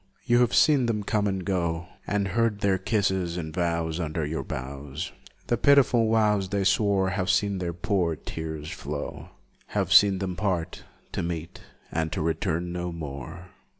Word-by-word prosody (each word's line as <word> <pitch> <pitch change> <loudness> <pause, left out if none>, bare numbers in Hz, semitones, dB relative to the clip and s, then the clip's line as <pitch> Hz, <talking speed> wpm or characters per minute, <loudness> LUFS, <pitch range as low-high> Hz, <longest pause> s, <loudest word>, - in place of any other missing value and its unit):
You 120 0 +4
have 125 -1 +3
seen 140 -5 +5
them 105 -3 -1
come 105 0 +1
and 95 -2 -2
go, 85 -3 -1 0.2
And 100 -1 0
heard 110 +1 +1
their 95 -2 +2
kisses 95 -4 0
and 80 -3 -5
vows 85 -1 -1
Under 80 -2 -2
your 80 +2 -2
boughs, 70 +5 -5 0.3
The 120 - +1
pitiful 125 -4 +4
vows 105 -4 +2
they 100 0 0
swore, 95 -1 +2
Have 95 0 -1
seen 100 +1 +2
their 90 -2 -2
poor 85 -1 0
tears 80 0 -6
flow, 75 -5 -6 0.5
Have - - +2
seen 100 -2 +7
them 95 -1 -3
part; 90 -3 -2 0.3
to - - -2
meet, 85 -1 -5 0.3
and 80 -1 -1
to - - -2
return, 80 +1 -1
no 90 0 -3
more! 85 +3 -7
90 Hz, 165 wpm, -26 LUFS, 80-100 Hz, 0.5 s, seen